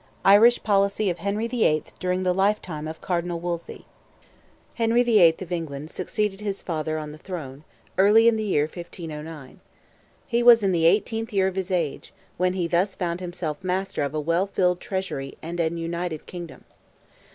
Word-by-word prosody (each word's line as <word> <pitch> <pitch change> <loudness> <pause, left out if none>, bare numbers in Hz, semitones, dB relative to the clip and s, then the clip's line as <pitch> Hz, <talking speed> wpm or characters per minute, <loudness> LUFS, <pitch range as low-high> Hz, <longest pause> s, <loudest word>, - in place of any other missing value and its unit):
IRISH 215 +5 +6
POLICY 200 -1 +2
OF 175 - -6
HENRY 200 +5 -1
THE 235 -1 0
EIGHTH 155 0 0
DURING 185 0 -1
THE 180 -1 +2
LIFETIME 185 -5 0
OF 160 +1 -8
CARDINAL 175 -1 -2
WOLSEY. 170 0 -5 0.9
Henry 230 +1 +2
the 235 -3 +4
Eighth 165 0 +5
of 180 - -12
England 155 -3 -4
succeeded 205 +2 -2
his 200 -2 -4
father 155 -2 -2
on 150 -1 -5
the 155 - -12
throne, 150 -6 -7 0.4
early 215 +4 +6
in 230 - +5
the 220 - -2
year 185 -8 +2
1509. 160 -3 -8 0.7
He 240 -1 0
was 235 -2 +7
in 195 - +2
the 165 -2 +1
eighteenth 225 +5 +1
year 195 -2 +2
of 190 - -3
his 190 -1 -2
age, 170 -6 -2 0.2
when 180 +1 +1
he 180 -2 -1
thus 180 +3 +1
found 175 -2 -2
himself 175 -3 -5
master 185 -1 -2
of 145 +1 -2
a - - 0
well 170 +5 +1
filled 180 -2 +1
treasury 190 -10 -4
and 170 +2 -6
an 165 0 0
united 170 -1 -4
kingdom. 175 -5 -9
180 Hz, 180 wpm, -24 LUFS, 165-200 Hz, 0.9 s, was